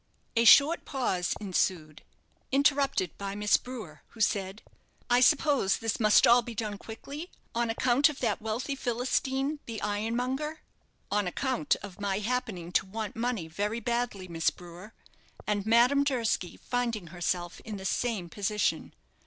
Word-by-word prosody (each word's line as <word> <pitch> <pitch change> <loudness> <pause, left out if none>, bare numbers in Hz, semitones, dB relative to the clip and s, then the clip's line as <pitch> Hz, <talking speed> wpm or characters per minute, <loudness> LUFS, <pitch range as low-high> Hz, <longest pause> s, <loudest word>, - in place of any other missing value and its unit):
A 230 0 +3
short 290 +8 +7
pause 190 -10 -1
ensued 175 -6 -1 0.5
interrupted 275 - +2
by 200 0 -4
Miss 210 0 +3
Brewer, 215 - -9
who 230 - -17
said, 200 -1 0 0.5
"I 245 - +6
suppose 280 -6 +3
this 225 -1 -2
must 215 -2 +6
all 240 +1 +6
be 235 0 -8
done 210 -2 -3
quickly 280 +9 -8 0.2
on 235 -1 0
account 250 +5 +3
of 295 - -7
that 220 -5 -1
wealthy 220 +6 -2
Philistine, 265 +3 -1
the 225 -2 -5
ironmonger?" 245 +9 -2 0.5
"On 205 -2 +1
account 265 +8 0
of 200 0 -9
my 195 -1 0
happening 210 -6 -3
to 185 - +2
want 215 +2 -5
money 230 -7 -2
very 205 +7 -2
badly, 235 -4 -2
Miss 165 -2 +1
Brewer, 180 +4 -12 0.5
and 205 -1 -1
Madame 245 +5 +5
Durski 235 -9 -1
finding 235 -6 -2
herself 175 0 -2
in 215 -2 -7
the 190 - -8
same 215 -4 -1
position. 205 +4 -1
225 Hz, 145 wpm, -29 LUFS, 195-250 Hz, 0.5 s, short